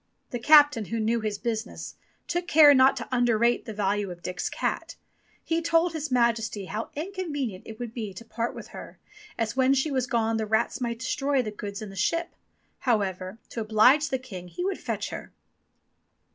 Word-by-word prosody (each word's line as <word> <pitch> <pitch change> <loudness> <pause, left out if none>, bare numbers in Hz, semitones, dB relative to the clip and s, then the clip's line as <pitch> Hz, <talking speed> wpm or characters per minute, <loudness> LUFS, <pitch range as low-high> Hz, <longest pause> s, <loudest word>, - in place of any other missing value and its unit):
The 245 - -3
captain 290 -3 +6
who 230 +3 -3
knew 225 +2 +1
his 215 -1 -2
business, 225 0 -4 0.3
took 350 +1 -2
care 295 -3 +8
not 265 0 +5
to 230 - -5
underrate 240 -1 +2
the 225 - -6
value 205 -1 0
of 175 -1 -9
Dick's 180 0 -3
cat. - - -3 0.5
He 330 0 0
told 330 +1 +2
His 310 -2 -3
Majesty 230 -5 +1
how 215 +4 -4
inconvenient 295 - -4
it 220 - -8
would 235 -1 -6
be 220 -4 -4
to 230 - -9
part 230 +1 -3
with - - -9
her, - - -10 0.4
as 230 0 -1
when 265 +1 +4
she 275 +3 0
was 260 -2 0
gone 225 -2 +1
the 220 -1 -2
rats 220 +4 0
might 235 -1 -2
destroy 270 +2 0
the 215 - -4
goods 205 0 -6
in 205 - -8
the - - -11
ship; 335 - -1 0.5
however, 195 -5 -1
to 230 - -4
oblige 250 +8 +4
the 265 - 0
king, 195 -9 -9
he 355 - -5
would 390 - -2
fetch - - -3
her. - - -7
235 Hz, 190 wpm, -27 LUFS, 215-275 Hz, 0.5 s, care